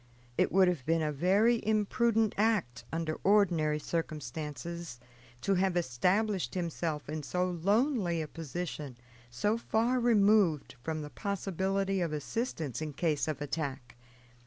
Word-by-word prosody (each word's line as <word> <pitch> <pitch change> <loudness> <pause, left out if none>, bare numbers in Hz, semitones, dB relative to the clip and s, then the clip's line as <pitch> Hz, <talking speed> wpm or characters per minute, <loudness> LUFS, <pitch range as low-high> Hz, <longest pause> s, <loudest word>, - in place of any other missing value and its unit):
It - - +2
would 190 +2 +5
have 175 -7 0
been 165 0 +2
a 150 - 0
very 200 +10 +3
imprudent 220 +1 +2
act, 195 - 0
under 160 -1 -2
ordinary 175 -7 +3
circumstances, 155 -1 -4 0.4
to 195 - +1
have 185 -1 +2
established 180 - +1
himself 165 -3 -2
in 155 +1 -3
so 180 +5 -1
lonely 200 - +1
a 155 - -3
position, 155 -4 -5 0.3
so 205 - 0
far 235 +3 +1
removed 210 - +3
from 155 +2 -3
the 150 - -8
possibility 195 -1 -1
of 165 -3 -1
assistance 155 - -3
in 155 -2 -4
case 155 0 0
of 150 -2 -2
attack. 140 -4 -4
170 Hz, 135 wpm, -31 LUFS, 150-200 Hz, 0.4 s, would